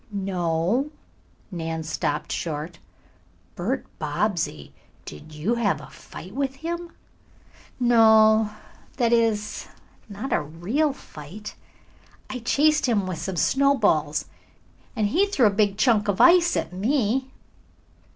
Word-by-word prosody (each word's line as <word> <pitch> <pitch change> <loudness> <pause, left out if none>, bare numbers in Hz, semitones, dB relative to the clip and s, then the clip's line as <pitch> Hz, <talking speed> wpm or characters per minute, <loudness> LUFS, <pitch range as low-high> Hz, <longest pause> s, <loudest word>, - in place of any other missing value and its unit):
"No." 190 - 0 0.6
Nan 165 -2 -4
stopped 155 0 -2
short. 160 +1 -4 0.7
"Bert 240 +10 -2
Bobbsey, 155 - -2 0.3
did 75 - -10
you 155 +9 -1
have 235 -4 0
a - - -12
fight 185 +4 -11
with 270 +1 -2
him?" 340 +2 -5 0.9
"No 220 -2 +5 0.5
that 235 -2 +2
is, 220 -2 0 0.4
not 210 +6 -4
a - - +2
real 180 - -1
fight. 205 - -10 0.8
I 255 - -4
chased 295 +5 +2
him 210 -5 +1
with 185 -3 -4
some 180 +3 -4
snowballs 165 - +2 0.7
and 215 -3 +1
he 380 - +2
threw 285 - +2
a 210 - +5
big 200 0 +1
chunk 215 -1 +3
of 200 0 0
ice 345 +6 +6
at - - -3
me." 250 +5 0
210 Hz, 120 wpm, -24 LUFS, 170-255 Hz, 0.9 s, ice